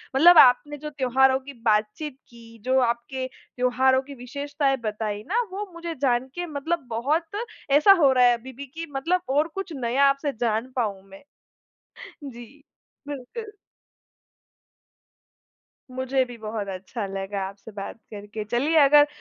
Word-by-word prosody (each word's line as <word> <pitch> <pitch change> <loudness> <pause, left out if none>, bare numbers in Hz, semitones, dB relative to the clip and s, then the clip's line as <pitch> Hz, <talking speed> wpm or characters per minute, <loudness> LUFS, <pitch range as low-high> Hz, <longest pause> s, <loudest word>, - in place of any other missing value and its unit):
मतलब 340 +4 +8
आपने 280 +4 +6
जो 300 +1 -6
त्योहारों 265 -1 +3
की 275 +1 -11
बातचीत 220 +7 0
की, 230 -1 -15
जो 260 +1 +3
आपके 245 +2 -1
त्योहारों 260 +1 +1
की 280 +1 -11
विशेषताएँ 280 +2 -2
बताईं 210 -1 -3
ना 470 +5 +2
वो 410 +2 -4
मुझे 335 -1 -6
जान 250 -1 +1
के 350 0 -3
मतलब 310 0 -3
बहुत 295 +9 0 0.4
ऐसा 300 +8 +7
हो 270 - +6
रहा 250 -1 +5
है 245 - +6
अभी 260 +3 -11
भी 280 +3 -8
की 325 +5 -7
मतलब 335 +7 0
और 295 +4 +2
कुछ 390 -4 -5
नया 260 +2 +2
आपसे 275 0 -1
जान 230 +2 -1
पाऊँ 205 -6 -1
मैं। 195 +7 -14 1.1
जी, 240 +4 -13 0.5
बिल्कुल। 415 - -7 2.4
मुझे 260 +1 0
भी 245 -1 -10
बहुत 215 -1 -5
अच्छा 195 +4 -5
लगा 195 +1 -4
आपसे 200 +3 -12
बात 200 -1 -7 0.2
करके, 210 +1 -6
चलिए 255 +9 0
अगर 290 +1 +6
260 Hz, 145 wpm, -25 LUFS, 230-290 Hz, 2.4 s, मतलब